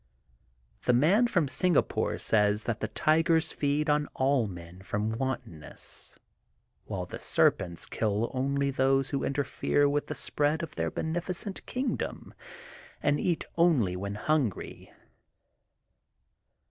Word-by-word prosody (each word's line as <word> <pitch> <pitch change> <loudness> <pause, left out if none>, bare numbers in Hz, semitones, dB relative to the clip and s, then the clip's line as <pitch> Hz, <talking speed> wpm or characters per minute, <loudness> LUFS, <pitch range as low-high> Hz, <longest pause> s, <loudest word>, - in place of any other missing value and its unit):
The 125 - +2
Man 180 - +4
from 175 -10 +1
Singapore 175 +3 +1
says 105 -1 +2
that 115 -2 -2
the - - -2
tigers 160 +1 +2
feed 145 +2 0
on 150 0 +2
all 130 -3 +2
men 90 -1 -10
from 105 +3 -2
wantonness, 115 - -5 0.7
while - - -4
the - - -8
serpents 85 -2 +1
kill 110 +1 -1
only 140 +1 0
those 135 0 +2
who 140 - -1
interfere 145 +1 +1
with 145 +1 0
the - - -4
spread 150 +2 0
of 165 - -6
their 80 -1 -1
beneficent 175 - -3
kingdom 255 +1 -3 0.7
and 145 0 +2
eat 175 -3 0
only 135 - +3
when 100 +2 -4
hungry. 130 -3 -1
140 Hz, 120 wpm, -29 LUFS, 110-155 Hz, 0.7 s, Man